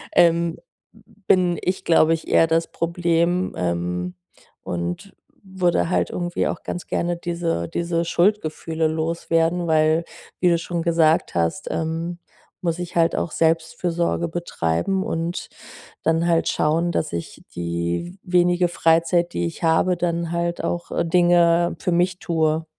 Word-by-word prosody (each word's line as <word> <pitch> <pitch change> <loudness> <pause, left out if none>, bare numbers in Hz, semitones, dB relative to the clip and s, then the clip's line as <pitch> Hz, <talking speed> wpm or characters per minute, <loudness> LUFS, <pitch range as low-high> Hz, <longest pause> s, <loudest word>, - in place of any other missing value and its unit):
ähm, 170 0 +3 0.4
bin 185 -3 0
ich, 185 +1 -2
glaube 165 -1 +4
ich, 165 - -4
eher - - +5
das 165 +1 0
Problem, 170 +1 0
ähm, 90 0 -2 0.5
und 90 - -4 0.3
würde 185 -4 0
halt 180 - +1
irgendwie 175 -1 -1
auch - - -4
ganz 175 - -5
gerne 175 0 -1
diese 170 - -2
diese 170 0 -1
Schuldgefühle 165 -3 0
loswerden. 165 +2 0
Weil, 160 +1 +3 0.3
wie 180 - +4
du 170 - +3
schon 170 0 -3
gesagt 165 -1 +2
hast, 85 -1 -1
ähm, 165 +2 -3 0.4
muss 170 -1 0
ich 175 0 -6
halt 165 -1 +3
auch 165 - -2
Selbstfürsorge 165 +1 0
betreiben 170 - -1
und 165 0 -3 0.5
dann 165 +1 +2
halt 165 -1 +2
schauen, 165 +3 +1
dass 155 - -1
ich 85 - -6
die 85 - -3
w 180 - -12
wenige 175 0 +3
Freizeit, 170 +1 +2
die 85 - -1
ich 85 - -8
habe, 165 +2 +3
dann 170 -1 -1
halt 170 0 -2
auch 175 0 -3
äh, - - 0
Dinge 175 0 +3
für 180 - -1
mich 180 +2 +1
tue. 160 -1 0
170 Hz, 140 wpm, -22 LUFS, 160-175 Hz, 0.5 s, eher